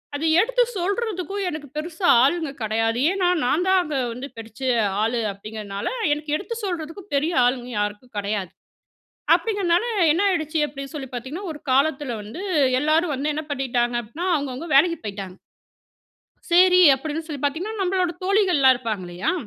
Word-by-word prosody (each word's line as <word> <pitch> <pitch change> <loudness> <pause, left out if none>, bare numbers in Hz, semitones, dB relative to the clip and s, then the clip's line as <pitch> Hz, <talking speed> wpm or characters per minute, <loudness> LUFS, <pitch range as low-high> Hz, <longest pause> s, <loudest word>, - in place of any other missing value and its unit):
அது 295 +3 -2
எடுத்து - - +3
சொல்றதுக்கும் 395 0 -2
எனக்கு 305 -3 -6
பெருசா 335 +4 -2 0.2
ஆளுங்க 315 +1 +1
கெடையாது. 225 +2 0
ஏனா 380 -2 +1 0.2
நான் 310 +8 +1
தான் 375 0 +5
அங்க 300 -3 -4 0.2
வந்து 250 +4 -7
படிச்ச 225 +2 -11 0.4
ஆளு 230 +2 0
அப்டிங்கிறனால, 200 0 -6 0.2
எனக்கு 295 0 -2
எடுத்து 435 +6 -6
சொல்றதுக்கும் 350 +2 -5
பெரிய 305 +5 +1
ஆளுங்க 245 0 -1
யாருக்கும் 205 +4 -4
கடையாது. 200 -3 -2 0.8
அப்டிங்கிறதனால 400 -5 +1 0.3
என்ன 335 +5 +1
ஆயிடுச்சு 320 -3 -1
அப்டின் 275 +1 -8
சொல்லி 275 -3 -5
பார்த்தீங்கன்னா, 260 - -6
ஒரு 295 - -10
காலத்துல 275 -2 +1
வந்து 215 - -8 0.4
எல்லாரும் 310 +2 +2
வந்து 285 +3 -1
என்ன 310 +1 -3
பண்ணிட்டாங்க 245 -3 0
அப்டின்னா 270 +11 -5
அவங்க, 285 -2 -2
அவங்க 295 +7 -7
வேலைக்கு 335 +4 +5
போயிட்டாங்க. 195 -3 -6 1.2
சேரி 365 +1 +6
அப்டின் 315 +3 -5
சொல்லி 290 -4 -6
பார்த்தீங்கன்னா, 365 +10 -2
நம்பளோட 365 -2 0
தோழிகள்லாம் 370 -10 +4
இருப்பாங்க 220 -6 -4
இல்லையா? 175 +2 -2
295 Hz, 150 wpm, -23 LUFS, 245-355 Hz, 1.2 s, சேரி